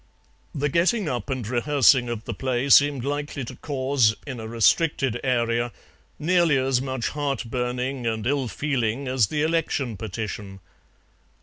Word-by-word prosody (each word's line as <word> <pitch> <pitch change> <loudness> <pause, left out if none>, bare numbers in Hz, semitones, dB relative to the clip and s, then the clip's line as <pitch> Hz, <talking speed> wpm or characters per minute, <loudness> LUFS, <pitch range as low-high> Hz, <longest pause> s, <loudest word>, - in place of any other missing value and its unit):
The 145 +1 0
getting 175 - +1
up 120 -4 -3
and 130 -5 -3
rehearsing 125 0 +3
of 115 -2 -4
the 115 - -4
play 130 +3 -2
seemed 140 -2 +5
likely 145 -1 -3
to - - -8
cause, 130 -6 +1
in 130 -4 -6
a 110 - -6
restricted 120 - +2
area, 120 -2 0 0.5
nearly 170 -2 +3
as 130 -1 +1
much 130 -2 -2
heart 145 -2 -2
burning 125 0 -2
and 110 -1 -2
ill 135 0 0
feeling 135 -1 -2
as 125 -5 +2
the 150 +5 -1
election 155 -8 -1
petition. 105 -3 -6
130 Hz, 145 wpm, -24 LUFS, 120-145 Hz, 0.5 s, seemed